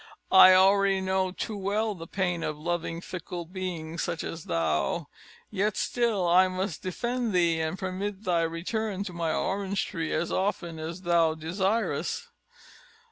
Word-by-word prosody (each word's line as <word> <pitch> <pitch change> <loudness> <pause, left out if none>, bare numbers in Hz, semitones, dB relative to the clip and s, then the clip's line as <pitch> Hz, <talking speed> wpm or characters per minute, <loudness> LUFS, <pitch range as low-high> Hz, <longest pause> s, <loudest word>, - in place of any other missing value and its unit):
I 185 0 +9
already 195 +1 +5
know 190 0 0
too 215 +3 -4
well 205 +2 0
the 165 -3 -9
pain 180 -3 -1
of 155 -2 -3
loving 170 +1 -3
fickle 175 -1 -6
beings 170 -2 -5
such 170 -1 -2
as 165 -1 -6
thou. 85 - 0 0.5
Yet 210 0 0
still 225 -7 +1
I 185 +2 +6
must 185 -3 -3
defend 235 +4 -2
thee, 170 -2 +3
and 160 +3 -2
permit 190 +2 -4
thy 175 -4 +2
return 190 +5 -2
to 190 -3 -7
my 165 -2 -1
orange 195 +3 -1
tree 165 -2 -4
as 165 +2 -1
often 175 -4 -1
as 165 +4 -6
thou 170 -2 +3
desirest." 190 +8 -1
185 Hz, 150 wpm, -28 LUFS, 165-195 Hz, 0.5 s, I